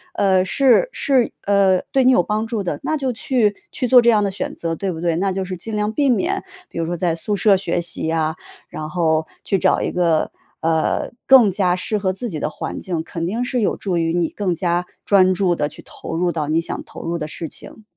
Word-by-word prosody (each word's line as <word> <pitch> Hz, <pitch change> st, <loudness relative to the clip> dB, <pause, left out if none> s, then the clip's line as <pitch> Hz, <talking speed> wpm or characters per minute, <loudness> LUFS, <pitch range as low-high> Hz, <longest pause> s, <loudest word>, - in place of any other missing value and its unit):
呃， 190 Hz, -2 st, +3 dB
是 270 Hz, -, +3 dB
是 260 Hz, -4 st, +1 dB
呃， 195 Hz, -2 st, +3 dB
对 270 Hz, -, +3 dB
你 255 Hz, -, +6 dB
有 215 Hz, -, +5 dB
帮 215 Hz, +4 st, -1 dB
助 225 Hz, -2 st, -3 dB
的， 160 Hz, -6 st, -3 dB
那 315 Hz, -, 0 dB
就 270 Hz, -4 st, -1 dB
去 225 Hz, -3 st, +1 dB, 0.2 s
去 250 Hz, -, -2 dB
做 250 Hz, +1 st, +7 dB
这 235 Hz, 0 st, +5 dB
样 210 Hz, -2 st, +3 dB
的 200 Hz, -, +1 dB
选 195 Hz, -, -5 dB
择， 165 Hz, -1 st, -3 dB
对 195 Hz, +2 st, -2 dB
不 165 Hz, -2 st, -6 dB
对？ 170 Hz, -1 st, +1 dB
那 190 Hz, +3 st, 0 dB
就 190 Hz, +1 st, -2 dB
是 185 Hz, -1 st, -5 dB
尽 215 Hz, +5 st, -6 dB
量 210 Hz, 0 st, 0 dB
避 285 Hz, +5 st, +1 dB
免， 345 Hz, -, +1 dB, 0.3 s
比 -, -, -10 dB
如 165 Hz, -, 0 dB
说 175 Hz, +2 st, -2 dB
在 170 Hz, -1 st, 0 dB
宿 205 Hz, +5 st, -2 dB
舍 200 Hz, 0 st, +4 dB
学 180 Hz, -2 st, -1 dB
习 170 Hz, -1 st, -4 dB
呀， 160 Hz, -1 st, 0 dB, 0.3 s
然 155 Hz, -, -6 dB
后 160 Hz, -2 st, +1 dB, 0.2 s
去 195 Hz, -, +1 dB
找 -, -, +2 dB
一 -, -, -1 dB
个， 170 Hz, -3 st, +1 dB, 0.3 s
呃， 160 Hz, -1 st, 0 dB
更 255 Hz, -6 st, +7 dB
加 180 Hz, -2 st, +1 dB
适 200 Hz, +4 st, -2 dB
合 190 Hz, -2 st, -1 dB
自 235 Hz, +6 st, -5 dB
己 160 Hz, -6 st, -4 dB
的 -, -, -1 dB
环 -, -, -5 dB
境， 175 Hz, -4 st, -3 dB
肯 165 Hz, 0 st, -5 dB
定 220 Hz, +8 st, -2 dB
是 250 Hz, 0 st, -1 dB
有 -, -, +1 dB
助 185 Hz, -4 st, -2 dB
于 165 Hz, -1 st, 0 dB
你 175 Hz, -2 st, +1 dB
更 195 Hz, -4 st, -2 dB
加 175 Hz, 0 st, -1 dB, 0.2 s
专 185 Hz, -2 st, +4 dB
注 180 Hz, -1 st, +1 dB
地 150 Hz, -, 0 dB
去 -, -, -12 dB
投 -, -, -8 dB
入 175 Hz, +1 st, +1 dB
到， 155 Hz, -3 st, -3 dB
你 160 Hz, +2 st, +1 dB
想 -, -, -5 dB
投 -, -, -10 dB
入 170 Hz, +1 st, -2 dB
的 155 Hz, -2 st, -4 dB
事 160 Hz, 0 st, -6 dB
情。 220 Hz, -, -11 dB
185 Hz, 260 characters per minute, -20 LUFS, 170-215 Hz, 0.3 s, 做